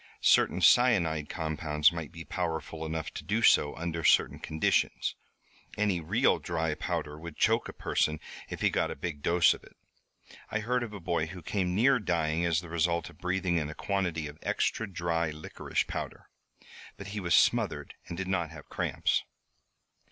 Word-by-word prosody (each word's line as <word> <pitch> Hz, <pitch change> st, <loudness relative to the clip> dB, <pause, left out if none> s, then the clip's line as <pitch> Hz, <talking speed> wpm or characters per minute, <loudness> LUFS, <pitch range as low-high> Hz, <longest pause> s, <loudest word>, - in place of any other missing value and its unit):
Certain -, -, +4 dB
cyanide 85 Hz, -12 st, +4 dB
compounds 75 Hz, -2 st, +1 dB
might 80 Hz, -4 st, -6 dB
be 85 Hz, -, -8 dB
powerful 80 Hz, -2 st, -3 dB
enough 80 Hz, 0 st, -3 dB
to -, -, -6 dB
do 110 Hz, +4 st, 0 dB
so 75 Hz, -, +5 dB
under 85 Hz, +1 st, -3 dB
certain -, -, +4 dB
conditions. 80 Hz, 0 st, 0 dB, 0.6 s
Any 105 Hz, -4 st, +1 dB
real 80 Hz, -, +2 dB
dry 80 Hz, -1 st, -1 dB
powder 75 Hz, 0 st, -3 dB
would 85 Hz, -1 st, -9 dB
choke -, -, +2 dB
a -, -, -4 dB
person 75 Hz, 0 st, 0 dB, 0.3 s
if -, -, -6 dB
he -, -, +3 dB
got -, -, +1 dB
a -, -, -4 dB
big 75 Hz, -1 st, -5 dB
dose 85 Hz, +1 st, +4 dB
of -, -, -12 dB
it. -, -, -18 dB, 0.7 s
I 105 Hz, -, -1 dB
heard 125 Hz, +3 st, 0 dB
of 120 Hz, -3 st, -4 dB
a 100 Hz, -, -6 dB
boy 85 Hz, -2 st, -1 dB
who 90 Hz, 0 st, -9 dB
came 90 Hz, 0 st, -1 dB
near 125 Hz, +5 st, +4 dB
dying 85 Hz, -4 st, 0 dB
as 85 Hz, -1 st, +2 dB
the 85 Hz, -, -11 dB
result 85 Hz, 0 st, 0 dB
of -, -, -21 dB
breathing 90 Hz, -1 st, 0 dB
in 75 Hz, -2 st, -1 dB
a 75 Hz, -, -7 dB
quantity 90 Hz, -5 st, -1 dB
of 75 Hz, +1 st, -11 dB
extra 110 Hz, -3 st, -1 dB
dry 85 Hz, -2 st, -1 dB
licorice 75 Hz, +1 st, -3 dB
powder. -, -, -6 dB, 0.7 s
But 100 Hz, 0 st, -8 dB
he 105 Hz, +1 st, -4 dB
was 85 Hz, -4 st, +2 dB
smothered -, -, +2 dB
and 85 Hz, -, -6 dB
did 95 Hz, 0 st, -3 dB
not 85 Hz, -4 st, 0 dB
have 80 Hz, -2 st, -12 dB
cramps." -, -, 0 dB
85 Hz, 180 wpm, -29 LUFS, 80-95 Hz, 0.7 s, so